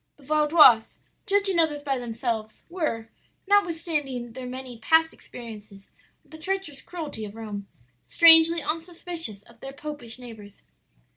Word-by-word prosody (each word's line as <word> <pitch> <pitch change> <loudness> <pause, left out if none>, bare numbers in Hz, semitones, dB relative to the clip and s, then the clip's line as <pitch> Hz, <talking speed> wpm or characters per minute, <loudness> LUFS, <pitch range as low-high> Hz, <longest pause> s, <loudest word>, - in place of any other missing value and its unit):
The 290 - -20
Vaudois, 300 -5 +5 0.3
judging 395 -3 +2
others 300 -3 0
by 270 -3 -1
themselves, 230 -2 -4
were, 305 -11 -3 0.4
notwithstanding 320 - 0
their 255 0 -7
many 255 -2 -8
past 320 +3 +3
experiences 210 -4 -12 0.3
of - - -28
the 315 - -11
treacherous 375 -4 -3
cruelty 310 -10 -7
of 210 0 -8
Rome, 210 -3 -7 0.4
strangely 330 -1 +7
unsuspicious 330 - -4
of 235 +1 -21
their 270 +2 -9
popish 275 -6 -8
neighbors. 220 -5 -13
280 Hz, 130 wpm, -25 LUFS, 230-325 Hz, 0.4 s, strangely